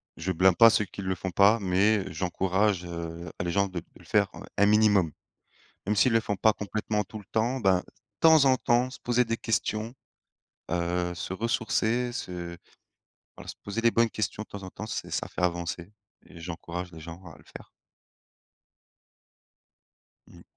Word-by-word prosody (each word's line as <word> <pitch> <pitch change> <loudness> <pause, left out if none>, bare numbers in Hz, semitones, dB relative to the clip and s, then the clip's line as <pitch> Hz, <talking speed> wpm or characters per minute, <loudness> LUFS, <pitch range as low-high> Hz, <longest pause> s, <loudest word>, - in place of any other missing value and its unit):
je 85 +3 -3
blâme 95 +1 +4
pas 115 +4 +8
ceux 105 -1 +2
qui 100 - -9
le 95 -1 -1
font 95 +1 -5
pas, 100 +5 +5
mais 100 +1 +2
heu, 95 - -7
j'encourage 95 +3 0
heu, 85 0 -6
à - - -1
les 85 - -2
gens 100 +3 +2
de 95 -2 -5
de - - -15
le - - -17
faire - - +2
un - - -10
un 100 - +5
minimum. 105 -5 +4 0.8
Même 105 - +1
s'ils 115 +4 +4
le 115 - +4
font 105 -2 -3
pas 110 +3 +4
complètement, 105 0 -2
tout 110 - -9
le 105 - -12
temps, 120 +4 0
ben, 95 -3 +3 0.4
temps 160 -3 +7
en 130 -1 +5
temps, 120 +1 +1
se - - -10
poser 120 0 +2
des 115 0 -1
questions. 110 0 -2 0.8
Heu 90 0 -1
se 90 - -5
ressourcer, 115 +3 0
se 90 -7 -6 0.8
voilà, - - -12
se - - -6
poser 100 +3 -3
les 115 0 +4
bonnes 115 0 +3
questions 110 0 -3
de - - -18
temps 100 -1 -9
en 95 - -7
temps, 110 +3 -8
c'est - - -5
ça - - -2
fait - - -6
avancer 85 +1 -2 0.3
et 85 - -14
j'encourage 85 +1 -6
les 80 - -11
gens 85 +2 -9
à 80 -3 -12
le 70 - -19
faire. - - -13 2.6
Mmh. - - -15
100 Hz, 190 wpm, -27 LUFS, 90-110 Hz, 2.6 s, pas